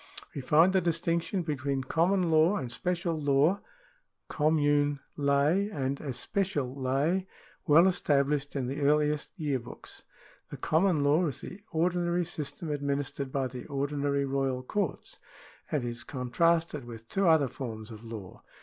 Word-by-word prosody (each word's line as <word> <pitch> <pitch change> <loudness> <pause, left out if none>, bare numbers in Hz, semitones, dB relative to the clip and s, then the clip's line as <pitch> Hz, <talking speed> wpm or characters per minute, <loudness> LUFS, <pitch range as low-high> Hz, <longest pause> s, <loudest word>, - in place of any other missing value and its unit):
We 140 - -4
find 160 +8 +4
the 190 - +4
distinction 170 +2 0
between 140 -3 -2
common 170 +5 +2
law 160 +5 +5
and 130 -10 -3
special 175 +3 -1
law 150 +5 +2 0.7
{commune 145 -2 +2 0.2
ley 145 +8 +2
and 140 -4 -2
especial 145 +1 -2
ley) 140 +8 0 0.4
well 165 +4 +7
established 145 -5 +1
in 135 -2 -1
the 135 +4 -4
earliest 150 +1 +2
Year 145 -6 -1
Books.^ 120 - -11 0.5
The - - -7
common 160 -2 +2
law 155 +5 +3
is 140 - -4
the 195 - -9
ordinary 175 +1 +1
system 160 -1 -5
administered 140 -1 -2
by 135 -1 0
the 125 -1 -7
ordinary 140 0 -1
royal 135 -2 -1
courts, 195 +4 -3 0.5
and 140 -5 -1
is 120 0 -5
contrasted 155 +3 0
with 115 -1 -10
two 195 +6 +1
other 160 -4 +5
forms 115 -4 -7
of 110 0 -10
law. 110 -5 -9
145 Hz, 140 wpm, -29 LUFS, 135-170 Hz, 0.7 s, well